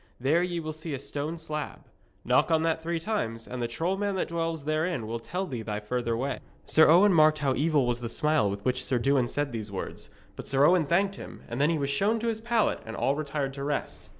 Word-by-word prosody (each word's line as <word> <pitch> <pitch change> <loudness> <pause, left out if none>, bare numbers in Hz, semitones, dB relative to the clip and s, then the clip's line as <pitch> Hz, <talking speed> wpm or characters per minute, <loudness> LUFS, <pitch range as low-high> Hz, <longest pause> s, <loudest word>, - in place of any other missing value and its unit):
There 145 +7 +2
ye 175 -1 -1
will 155 -1 -4
see 155 -1 -5
a - - -6
stone 145 +4 -4
slab. 150 -2 -5 0.4
Knock - - +3
on 160 -1 +3
that 165 0 0
three 170 +1 -2
times, 115 - -3
and 125 -1 -5
the 120 - 0
troll 165 +11 -1
man 200 -1 -1
that 185 - -1
dwells 165 -3 -2
therein 155 -4 -1
will 115 +2 -4
tell 180 +11 -3
thee 125 -9 -5
thy 105 -1 -3
further 115 +1 -2
way.' 135 +2 -2 0.3
Sir 160 0 +6
Owen 185 +5 +6
marked 155 -1 +5
how 140 -3 +1
evil 145 0 +2
was 120 0 0
the 120 -1 -4
smile 150 -3 +2
with 100 0 -5
which 130 0 +1
Sir 130 - 0
Dewin 130 0 +2
said 145 +2 -2
these 110 -3 -5
words; 95 - -6 0.3
but - - -8
Sir 135 +1 +4
Owen 175 -2 +4
thanked 195 +5 +1
him, - - -10
and 120 +3 -3
then 150 - +4
he 165 - +1
was 140 -1 -1
shown 200 +11 +2
to 235 - 0
his 220 -1 -3
pallet 230 -1 +1
and 115 - -7
all 135 - +1
retired 145 -2 -3
to 140 0 -6
rest. 145 0 -3
150 Hz, 245 wpm, -28 LUFS, 125-165 Hz, 0.4 s, Sir